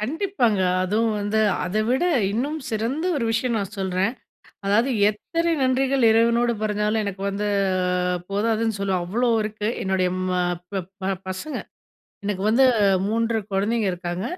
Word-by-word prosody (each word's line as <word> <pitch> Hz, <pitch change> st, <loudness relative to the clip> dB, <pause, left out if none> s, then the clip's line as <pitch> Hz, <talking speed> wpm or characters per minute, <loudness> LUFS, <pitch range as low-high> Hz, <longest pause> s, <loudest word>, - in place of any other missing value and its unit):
கண்டிப்பாங்க! 255 Hz, -, 0 dB, 0.2 s
அதுவும் 215 Hz, +4 st, +1 dB
வந்து 210 Hz, +2 st, 0 dB, 0.2 s
அத 190 Hz, +4 st, -3 dB
விட 260 Hz, +7 st, +2 dB, 0.3 s
இன்னும் 285 Hz, +8 st, -1 dB
சிறந்த 230 Hz, +9 st, -2 dB
ஒரு 240 Hz, -, -1 dB
விஷயம் 230 Hz, +1 st, 0 dB
நான் 195 Hz, -2 st, -4 dB
சொல்றேன். 190 Hz, +3 st, 0 dB, 0.5 s
அதாவது 225 Hz, +7 st, +2 dB, 0.2 s
எத்தனை 335 Hz, +10 st, -2 dB
நன்றிகள் 260 Hz, -1 st, +2 dB
இறைவனோடு 235 Hz, +1 st, +3 dB
பறஞ்சாலும் 210 Hz, +1 st, 0 dB
எனக்கு 195 Hz, -1 st, -5 dB
வந்து 205 Hz, +1 st, -2 dB, 0.9 s
போதாதுன்னு 220 Hz, +1 st, 0 dB
சொல்லுவேன் 190 Hz, -3 st, 0 dB
அவ்ளோ 235 Hz, +6 st, 0 dB
இருக்கு! 215 Hz, 0 st, -3 dB, 0.2 s
என்னுடைய 190 Hz, -1 st, +1 dB, 0.2 s
ம -, -, -1 dB, 0.4 s
பெ 195 Hz, -, 0 dB, 0.2 s
ப 195 Hz, 0 st, +1 dB, 0.2 s
பசங்க! 285 Hz, +12 st, -4 dB, 0.7 s
எனக்கு 200 Hz, -2 st, -2 dB
வந்து 255 Hz, +5 st, +5 dB, 0.4 s
3 230 Hz, +1 st, 0 dB, 0.2 s
குழந்தைங்க 210 Hz, +2 st, +1 dB
இருக்காங்க, 175 Hz, +2 st, -4 dB
220 Hz, 135 wpm, -23 LUFS, 200-240 Hz, 0.9 s, வந்து